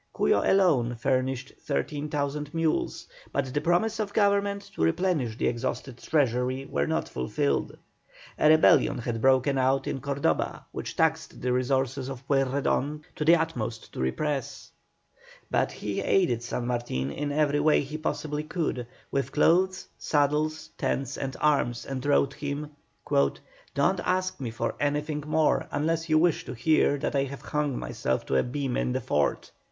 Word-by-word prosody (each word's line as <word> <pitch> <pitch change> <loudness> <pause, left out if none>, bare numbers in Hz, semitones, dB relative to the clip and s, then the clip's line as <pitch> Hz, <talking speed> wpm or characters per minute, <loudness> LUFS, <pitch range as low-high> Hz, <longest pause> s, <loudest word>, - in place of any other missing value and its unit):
Cuyo 100 - +3
alone 150 -12 +3
furnished 130 +1 -1
13,000 145 - -2
mules, 165 -1 -1 0.2
but 130 -2 -2
the 145 - 0
promises 215 +6 +1
of 205 -2 -2
Government 200 -1 +2
to - - -5
replenish 125 - +1
the - - -1
exhausted 120 +1 -2
treasury 130 -2 0
were 70 - -1
not - - -1
fulfilled. 65 +2 -1 0.6
A 150 - +5
rebellion 155 -3 +5
had 120 -2 -3
broken 135 +1 +3
out 135 +1 +2
in 135 - -3
Cordoba 140 - -1
which - - -6
taxed - - 0
the 125 0 0
resources 130 +1 0
of 135 0 -8
Pueyrredon 140 +2 0
to - - -2
the 165 +3 +7
utmost 160 -9 -3
to - - -7
repress; 135 - -2 0.8
but - - +1
he 100 -1 -4
aided 165 -12 +2
San 120 0 -3
Martin 120 - -2
in 145 - -3
every 145 0 +2
way 150 +1 +4
he 145 +2 -6
possibly 150 -1 -2
could, 155 -6 -3 0.2
with 140 -1 -1
clothes, 185 +5 +3
saddles, 150 +1 0
tents, 135 -1 -1
and 135 -1 -4
arms, 140 -6 +1
and 130 -2 -4
wrote 140 -1 +3
him: 145 +1 -4 0.4
"Don't 140 - 0
ask 185 -2 0
me 130 -4 -3
for 115 - -2
anything 150 +1 -1
more 155 0 +2
unless 165 +3 -1
you 155 - +5
wish 165 0 +3
to - - -6
hear 145 +3 +3
that 140 - -2
I 140 0 +2
have 140 0 -8
hung 150 -3 -1
myself 65 0 -2
to - - -1
a - - +5
beam 135 0 -2
in 60 0 0
the - - 0
fort." 75 -1 0
140 Hz, 160 wpm, -27 LUFS, 125-155 Hz, 0.8 s, the